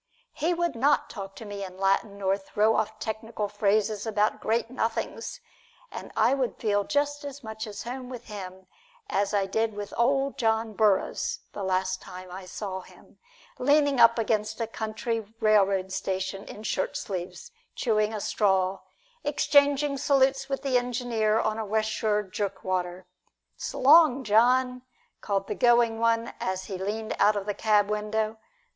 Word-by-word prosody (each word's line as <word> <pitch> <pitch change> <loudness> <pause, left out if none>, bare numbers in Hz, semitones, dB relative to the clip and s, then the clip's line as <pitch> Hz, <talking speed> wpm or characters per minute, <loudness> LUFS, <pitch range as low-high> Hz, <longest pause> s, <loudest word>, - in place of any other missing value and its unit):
He 320 +3 0
would 345 -3 0
not 280 +5 +2
talk 195 -2 -7
to 225 - -9
me 205 -1 -6
in 185 -1 -8
Latin 195 +2 +1
nor 195 -1 +1
throw 210 +3 +1
off 215 0 -1
technical 220 -1 -4
phrases 210 +1 0
about 210 0 +1
great 230 +1 0
nothings, 230 -3 -3 0.5
and - - -8
I - - +4
would 265 -3 -1
feel 205 -2 +1
just 290 +2 -1
as 285 -1 -8
much 220 0 -6
at 205 - -7
home 250 +1 -6
with 245 -2 -7
him 190 -3 -8 0.5
as 200 0 +1
I 200 -2 +1
did 220 +2 -1
with 205 -1 -6
Ol' 270 +3 +2
John 225 -3 0
Burroughs 205 -2 +1
the 205 - -6
last 185 0 0
time 185 0 -10
I 185 +1 -8
saw 190 -1 -5
him, - - -19 0.4
leaning 285 0 +3
up 230 0 +7
against 215 -1 0
a 230 - 0
country 220 +1 -3 0.2
railroad 195 -3 +3
station 190 0 -3
in 215 - -10
shirt 190 - -1
sleeves, 195 - -6 0.2
chewing 215 -3 +1
a 215 - -4
straw, 190 -2 +1 0.4
exchanging 285 -1 +3
salutes 270 -1 +2
with 275 0 -2
the 260 -3 +3
engineer 235 -3 0
on 215 0 -1
a - - -1
West 220 +1 0
Shore 210 -1 0
jerkwater. 185 -2 -3 0.5
"S' - - -5
long, 280 -2 +6
John!" 250 +3 +3 0.4
called 195 -1 -1
the 210 - -3
going 235 +1 +3
one 230 0 +1
as 185 0 -2
he 190 -3 -6
leaned 215 +3 -3
out 210 +1 +5
of 200 -1 -3
the 205 - -1
cab 210 -1 +3
window. 215 +1 -1
215 Hz, 165 wpm, -27 LUFS, 200-245 Hz, 0.5 s, up